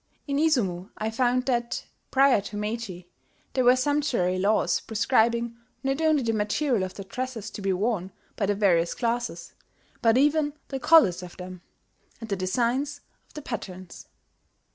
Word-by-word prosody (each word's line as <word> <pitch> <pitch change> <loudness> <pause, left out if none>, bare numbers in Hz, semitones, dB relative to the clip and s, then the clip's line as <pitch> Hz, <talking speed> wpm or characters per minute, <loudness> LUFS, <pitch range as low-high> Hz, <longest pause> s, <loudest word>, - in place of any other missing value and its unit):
In 280 -1 -1
Izumo 210 - +1
I 220 +1 -2
found 250 +2 +1
that, 240 -2 -1 0.2
prior 270 -5 +4
to 205 +1 -7
Meiji, 210 -4 -4 0.5
there 260 - +2
were 250 +1 +6
sumptuary 255 -9 +1
laws 205 +3 +2
prescribing 235 +1 +1 0.3
not 270 +3 0
only 310 -4 +3
the 225 -1 0
material 220 +3 +1
of 185 0 -4
the 195 - -6
dresses 230 +1 -5
to - - -7
be 195 -1 0
worn 190 -1 -1 0.2
by 200 - -1
the 205 - +1
various 175 -5 +2
classes, 235 -7 -2 0.5
but 230 0 +4
even 295 +1 +3 0.2
the 270 - -3
colours 245 - +5
of 180 -1 -10
them, 180 -1 -8 0.6
and 225 - -8
the - - +2
designs 245 +9 -1 0.3
of - - -27
the 300 - -7
patterns. 185 -7 -7
230 Hz, 160 wpm, -26 LUFS, 195-260 Hz, 0.6 s, were